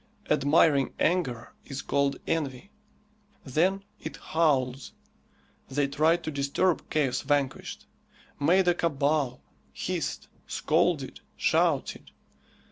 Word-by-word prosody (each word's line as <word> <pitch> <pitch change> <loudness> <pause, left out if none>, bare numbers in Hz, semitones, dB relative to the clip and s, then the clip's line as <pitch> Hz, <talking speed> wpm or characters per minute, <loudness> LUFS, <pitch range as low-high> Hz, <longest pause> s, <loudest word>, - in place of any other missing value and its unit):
Admiring 145 -1 +3
anger 155 -10 0
is 135 -1 -6
called 140 0 +1
envy. 150 +3 -2 0.7
Then 180 +8 +1 0.2
it - - -7
howls! 135 -5 0 0.8
They 140 +1 +1
tried 155 +4 +2
to 155 - -3
disturb 140 +5 0
"Chaos 140 -5 +1
Vanquished;" 140 -1 -1 0.5
made 180 +6 +3
a 175 - +5
cabal, 145 -5 0 0.3
hissed, - - -3 0.2
scolded, - - 0 0.2
shouted! - - +1
145 Hz, 95 wpm, -28 LUFS, 135-165 Hz, 0.8 s, a